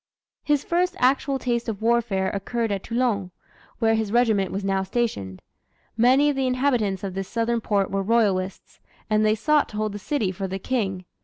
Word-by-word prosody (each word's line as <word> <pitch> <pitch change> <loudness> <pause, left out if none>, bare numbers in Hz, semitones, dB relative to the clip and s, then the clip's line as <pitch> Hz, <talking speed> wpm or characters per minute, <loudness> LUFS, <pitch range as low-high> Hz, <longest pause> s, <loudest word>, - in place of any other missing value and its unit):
His 295 -2 +1
first 360 +2 0
actual 270 +2 +2
taste 240 -2 -1
of 210 -3 -4
warfare 220 -4 +1
occurred 225 +3 -2
at 195 -1 -1
Toulon, 230 -5 -1 0.5
where 225 -2 +2
his 220 -2 -1
regiment 220 -5 +2
was 195 +1 -3
now 195 0 +1
stationed. 190 - -3 0.5
Many 255 +5 +4
of - - -4
the 265 -1 0
inhabitants 250 -7 0
of 195 -2 -4
this 195 0 -4
Southern 230 +1 -1
port 200 -2 0
were 195 0 0
royalists, 195 -3 0 0.3
and 215 0 +3
they 215 0 +3
sought 295 +7 +2
to 210 - -8
hold 215 0 -1
the 205 - -6
city 210 -3 -1
for 195 +1 -4
the 190 +1 -4
King. 195 -4 -2
220 Hz, 185 wpm, -24 LUFS, 195-245 Hz, 0.5 s, Many